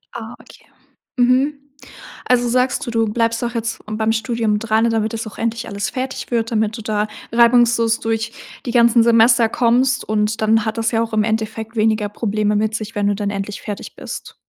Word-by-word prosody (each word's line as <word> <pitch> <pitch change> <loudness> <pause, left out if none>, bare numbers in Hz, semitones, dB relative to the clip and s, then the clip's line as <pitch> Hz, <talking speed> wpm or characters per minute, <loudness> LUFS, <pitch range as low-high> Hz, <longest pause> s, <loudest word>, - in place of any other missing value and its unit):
Ah, - - -7
okay. - - -18 0.5
Mhm. 260 +4 +2 0.7
Also, 245 -1 +2
sagst 250 +1 +1
du: - - -2
„Du 225 -1 +1
bleibst 230 +1 0
doch 240 0 -3
jetzt 225 0 -3
beim 220 +1 0
Studium 225 -2 0
dran, 225 +1 +1
damit 220 -1 0
das 225 0 -4
auch 215 - -11
endlich 230 +1 -2
alles 200 -2 -3
fertig 260 +3 -5
wird, 230 -1 0
damit 220 0 0
du - - -7
da 210 -1 -1 0.2
reibungslos 235 -1 +4
durch 225 0 -2 0.3
die 240 - -2
ganzen 235 -1 +5
Semester 230 0 +5
kommst“ 245 +2 +2
und 215 0 0
dann 220 +1 +3
hat 220 +1 -3
das 225 0 0
ja 225 -1 +1
auch 225 -1 -7
im 215 -1 +2
Endeffekt 220 +1 -3
weniger 215 -1 +1
Probleme 210 0 -1
mit 215 +1 0
sich, 220 0 -5
wenn 205 -1 0
du 205 - +1
dann 200 0 -2
endlich 200 0 -5
fertig 205 -1 -7
bist. - - -8
225 Hz, 195 wpm, -19 LUFS, 215-235 Hz, 0.7 s, ganzen